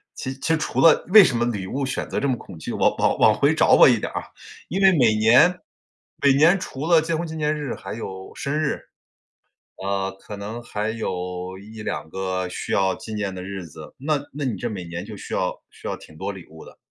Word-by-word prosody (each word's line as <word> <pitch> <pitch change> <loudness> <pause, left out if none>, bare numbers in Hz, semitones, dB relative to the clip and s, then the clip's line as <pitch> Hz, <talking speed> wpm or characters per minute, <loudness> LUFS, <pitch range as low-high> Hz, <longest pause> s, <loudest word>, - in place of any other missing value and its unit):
其 130 - -4
其 140 - -5
实 - - +3
除 155 - -1
了 165 -2 +6
为 215 +1 +10
什 130 - +1
么 120 - +1
礼 105 -6 -2
物 135 +6 -2
选 130 - -3
择 - - -1
这 140 - 0
么 130 - +2
恐 90 - -12
惧， - - -5
往 - - +2
往 - - +2
往 - - +6
回 - - +3
找 - - +5
回 - - +8
一 - - 0
点 - - -4
啊， - - -3 0.5
因 190 +5 -1
为 195 - +8
每 115 -5 +4
年 125 +12 +5 0.6
每 140 -1 +6
年 165 +7 +5
除 140 -4 -6
了 170 -2 +6
结 160 +1 -1
婚 170 - -2
纪 160 - -7
念 155 -1 0
日 145 -4 -4
还 95 +1 -7
有 95 -4 -7
生 150 +2 -2
日， 155 - -1 1.0
呃， 95 0 -1
可 105 0 -9
能 110 +4 -6
还 105 -1 -3
有 90 -4 -4
1-2 105 -5 -6
个 95 0 -2
需 - - -6
要 95 -1 +2
纪 110 - -8
念 100 -3 -3
的 90 - -6
日 95 -2 -6
子， 80 -1 -12
那 150 +3 0 0.2
那 145 0 -3
你 120 -6 -2
这 120 - -3
每 95 -5 -6
年 85 +2 -6
就 105 -1 -9
需 - - -8
要 - - -1
需 - - -10
要 - - -3
挺 80 - -15
多 100 - -3
礼 95 -3 -11
物 80 0 -13
的。 - - -15
110 Hz, 250 characters per minute, -23 LUFS, 95-145 Hz, 1.0 s, 为